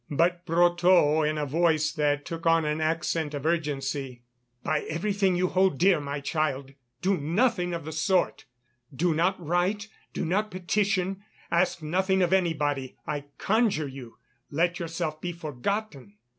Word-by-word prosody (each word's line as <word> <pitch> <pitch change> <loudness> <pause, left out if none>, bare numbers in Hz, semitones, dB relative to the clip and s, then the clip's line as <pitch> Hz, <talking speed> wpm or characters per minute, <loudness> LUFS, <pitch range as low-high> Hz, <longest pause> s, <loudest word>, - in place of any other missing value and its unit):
But 175 +4 +1
Brotteaux 175 -2 +4
in 155 0 0
a 150 - -1
voice 155 0 +2
that 145 -2 0
took 165 -1 -4
on 165 -1 +4
an 150 +1 -1
accent 160 -1 -1
of 145 0 -5
urgency: 140 -6 -2 0.4
"By 155 - +1
everything 195 +3 +1
you 180 0 +1
hold 185 -5 +2
dear, 185 0 +4
my 140 0 -4
child, 140 -3 -1 0.3
do 190 0 +2
nothing 175 - +1
of 165 - -6
the 160 - -5
sort! 180 +4 0 0.5
Do 165 +5 +1
not 180 +5 +1
write, 180 +6 0 0.2
do - - -3
not 205 +6 0
petition; 190 0 0 0.3
ask 170 -1 +1
nothing 190 +4 +1
of 180 +1 +1
anybody, 150 -7 0
I 145 -1 -3
conjure 215 -8 +1
you, 130 -4 -10 0.3
let 170 +4 0
yourself 165 -2 -3
be 175 - -3
forgotten." 155 - -4
165 Hz, 150 wpm, -27 LUFS, 150-185 Hz, 0.5 s, Brotteaux